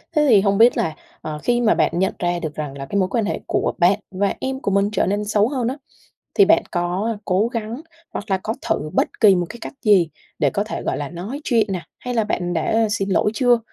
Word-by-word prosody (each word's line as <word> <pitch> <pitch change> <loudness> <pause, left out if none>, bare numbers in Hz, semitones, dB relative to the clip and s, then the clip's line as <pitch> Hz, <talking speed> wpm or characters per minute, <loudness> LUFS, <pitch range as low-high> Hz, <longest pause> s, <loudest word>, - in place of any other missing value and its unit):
Thế 300 -1 +4
thì 210 -5 +6
hông 200 0 +2
biết 235 +3 +6
là, 160 - -1 0.3
ờ, 155 -1 -5
khi 240 0 +2
mà 225 -2 +4
bạn - - +2
nhận 190 - +1
ra 175 -1 0
được 155 -3 -5
rằng 145 -2 -5
là 135 - -6
cái 200 +8 -1
mối 185 -1 +1
quan 225 +1 0
hệ - - -2
của - - 0
bạn 190 +2 +4
và 195 +1 0
em 265 0 -3
của 200 - -2
mình 200 +1 +2
trở 210 - +1
nên 205 +2 -1
xấu 210 0 +2
hơn 255 -4 -1
á, 260 +4 -2 0.6
thì 405 - +7
bạn 330 - +4
có 180 +6 -1
cố 190 +4 +2
gắng 230 +2 -4 0.3
hoặc - - -4
là 190 - +3
có 220 - -1 0.2
thử 155 - 0
bất - - +2
kỳ 205 -4 +7
một 175 -1 0
cái 235 - -8
cách - - -7
gì 195 -7 +4 0.3
để - - +3
có 205 - -1
thể 215 - -5
gọi - - -1
là 145 -1 -4
nói 195 - -6
chuyện 230 -6 +2
nè, 180 - -3 0.2
hay 250 - -4
là 225 -2 +2
bạn 180 -4 -2
đã 220 +7 +1
xin 200 -2 -1
lỗi 195 +2 +2
chưa? 245 -1 +3
205 Hz, 260 wpm, -21 LUFS, 180-230 Hz, 0.6 s, thì